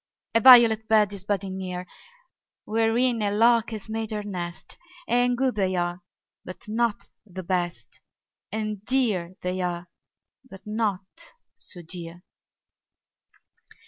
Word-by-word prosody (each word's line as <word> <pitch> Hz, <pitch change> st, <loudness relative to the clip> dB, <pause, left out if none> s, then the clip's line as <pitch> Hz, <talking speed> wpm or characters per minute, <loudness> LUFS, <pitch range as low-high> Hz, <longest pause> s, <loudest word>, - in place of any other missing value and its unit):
A 230 Hz, -, +5 dB
violet 230 Hz, -3 st, +8 dB
bed 210 Hz, -2 st, +3 dB
is 195 Hz, -2 st, -9 dB
budding 195 Hz, -2 st, -2 dB
near, 180 Hz, -1 st, -5 dB, 0.8 s
Wherein 225 Hz, +2 st, +1 dB
a 205 Hz, -, +1 dB
lark 230 Hz, +2 st, +3 dB
has 220 Hz, -2 st, -7 dB
made 220 Hz, 0 st, -3 dB
her 210 Hz, -1 st, -3 dB
nest: 175 Hz, -4 st, -6 dB, 0.3 s
And 245 Hz, +1 st, +2 dB
good 260 Hz, 0 st, +1 dB
they 190 Hz, -3 st, 0 dB
are, 175 Hz, 0 st, -2 dB, 0.4 s
but 185 Hz, -, -10 dB
not 225 Hz, 0 st, -1 dB, 0.2 s
the 190 Hz, -3 st, -8 dB
best; 175 Hz, -1 st, -3 dB, 0.5 s
And 215 Hz, -2 st, -4 dB
dear 215 Hz, -9 st, 0 dB
they 180 Hz, +1 st, -2 dB
are, 175 Hz, -1 st, -3 dB, 0.6 s
but 195 Hz, -3 st, -13 dB
not 210 Hz, -3 st, -1 dB, 0.5 s
so 175 Hz, -2 st, -9 dB
dear. 170 Hz, +1 st, -9 dB
205 Hz, 125 wpm, -25 LUFS, 180-225 Hz, 0.8 s, violet